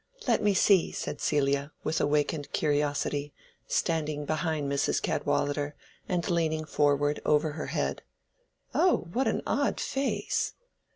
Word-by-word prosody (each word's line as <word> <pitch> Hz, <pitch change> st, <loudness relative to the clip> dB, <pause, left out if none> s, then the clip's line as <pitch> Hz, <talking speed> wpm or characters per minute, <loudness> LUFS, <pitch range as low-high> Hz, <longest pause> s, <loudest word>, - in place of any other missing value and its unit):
"Let 235 Hz, -, +3 dB
me 205 Hz, -2 st, +3 dB
see!" 190 Hz, -2 st, +4 dB
said -, -, -5 dB
Celia, 140 Hz, 0 st, +1 dB
with 160 Hz, -, 0 dB
awakened 145 Hz, 0 st, 0 dB
curiosity, 145 Hz, -1 st, 0 dB, 0.3 s
standing 155 Hz, -3 st, 0 dB
behind 155 Hz, -1 st, -1 dB
Mrs. 140 Hz, 0 st, +1 dB
Cadwallader 145 Hz, 0 st, -1 dB, 0.3 s
and 175 Hz, -2 st, 0 dB
leaning 160 Hz, -2 st, 0 dB
forward 145 Hz, -1 st, +2 dB
over 150 Hz, +1 st, +2 dB
her 150 Hz, +1 st, -5 dB
head. -, -, -2 dB, 0.7 s
"Oh, 360 Hz, -, +3 dB
what 255 Hz, +2 st, +1 dB
an 220 Hz, -, 0 dB
odd 285 Hz, 0 st, 0 dB
face!" 270 Hz, 0 st, -1 dB
150 Hz, 125 wpm, -29 LUFS, 145-170 Hz, 0.7 s, see